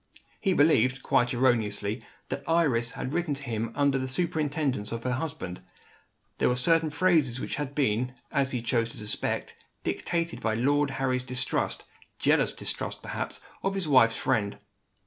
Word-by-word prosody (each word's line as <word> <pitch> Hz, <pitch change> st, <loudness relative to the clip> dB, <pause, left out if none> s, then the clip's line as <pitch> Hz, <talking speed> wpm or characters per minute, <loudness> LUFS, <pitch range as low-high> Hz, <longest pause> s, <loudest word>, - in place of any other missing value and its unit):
He 195 Hz, -3 st, +2 dB
believed 135 Hz, -5 st, +3 dB
(quite 125 Hz, -1 st, +3 dB
erroneously) 110 Hz, -3 st, +1 dB, 0.3 s
that 140 Hz, +1 st, -3 dB
Iris 135 Hz, -9 st, +2 dB
had 130 Hz, -, -4 dB
written 170 Hz, -4 st, 0 dB
to 140 Hz, -, -6 dB
him 115 Hz, -2 st, -2 dB
under 140 Hz, -2 st, +2 dB
the 130 Hz, -, -2 dB
superintendence 145 Hz, -6 st, -1 dB
of 115 Hz, 0 st, -4 dB
her 125 Hz, -, 0 dB
husband. 140 Hz, -, -4 dB, 0.8 s
There -, -, +3 dB
were 125 Hz, -, +2 dB
certain 160 Hz, +5 st, +3 dB
phrases 150 Hz, -6 st, +3 dB
which -, -, -3 dB
had 145 Hz, -1 st, -4 dB
been, 125 Hz, -2 st, +1 dB, 0.2 s
as 135 Hz, -1 st, +1 dB
he 125 Hz, -3 st, -3 dB
chose 115 Hz, -1 st, +1 dB
to -, -, -11 dB
suspect, 105 Hz, -1 st, -3 dB, 0.3 s
dictated 170 Hz, -1 st, -2 dB
by 110 Hz, -1 st, 0 dB
Lord 145 Hz, +4 st, +2 dB
Harry's 130 Hz, -1 st, 0 dB
distrust 125 Hz, 0 st, -1 dB, 0.3 s
jealous -, -, +3 dB
distrust, -, -, -4 dB
perhaps -, -, -4 dB, 0.2 s
of 195 Hz, 0 st, -1 dB
his 190 Hz, -4 st, -1 dB
wife's 130 Hz, -5 st, +5 dB
friend. 100 Hz, -2 st, 0 dB
130 Hz, 160 wpm, -28 LUFS, 115-150 Hz, 0.8 s, wife's